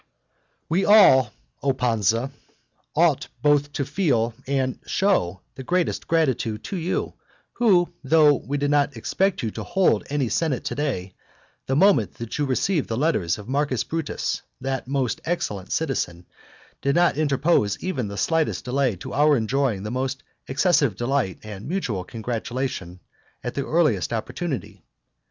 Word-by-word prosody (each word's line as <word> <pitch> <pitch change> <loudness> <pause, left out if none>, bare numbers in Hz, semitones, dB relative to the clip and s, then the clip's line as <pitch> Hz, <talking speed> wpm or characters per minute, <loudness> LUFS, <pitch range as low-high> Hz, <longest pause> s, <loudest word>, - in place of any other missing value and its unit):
I. - - -46 0.6
We 175 +4 +2
all, 185 - +7 0.3
O 140 -1 +2
Pansa, 115 0 +1 0.6
ought - - +3 0.2
both 145 -1 +3
to 140 - -1
feel 120 - +1
and 135 -2 -1
to - - -18
show 100 - +1
the 130 - -9
greatest 175 +6 -1
gratitude 130 -9 0
to - - -5
you, 175 0 -2 0.4
who 185 -8 +3
though 150 +1 +5
we 145 +1 -3
did 145 0 0
not 145 -1 +2
expect 195 0 0
that - - -5
you - - 0
would 110 - -6
hold 180 - +2
any 140 -3 0
senate 145 +1 0
to - - -3
day, 110 -11 -3 0.5
the 135 - +1
moment 160 - +4
that 115 +4 -6
you 145 - +2
received 155 +5 0
the 110 - -1
letters 125 - +1
of 105 0 -10
Marcus 135 -1 0
Brutus, 165 0 -3 0.2
that 135 -1 -3
most 135 -3 -1
excellent 105 - -3
citizen, 90 - -2 0.6
did 140 0 +1
not 175 -2 +4
interpose 140 - +2
even 140 - -2
the 100 0 -6
slightest 160 +8 0
delay 130 -3 +1
to 90 - -8
our 145 0 +4
enjoying 115 -3 0
the 105 - -4
most 130 +2 -2 0.2
excessive 135 - +2
delight 120 -3 -1
and 105 -1 -8
mutual 125 - -2
congratulation 115 -3 -4 0.4
at 125 - -3
the 140 - -2
earliest 150 - +2
opportunity. 125 - -4
135 Hz, 155 wpm, -24 LUFS, 115-155 Hz, 0.6 s, all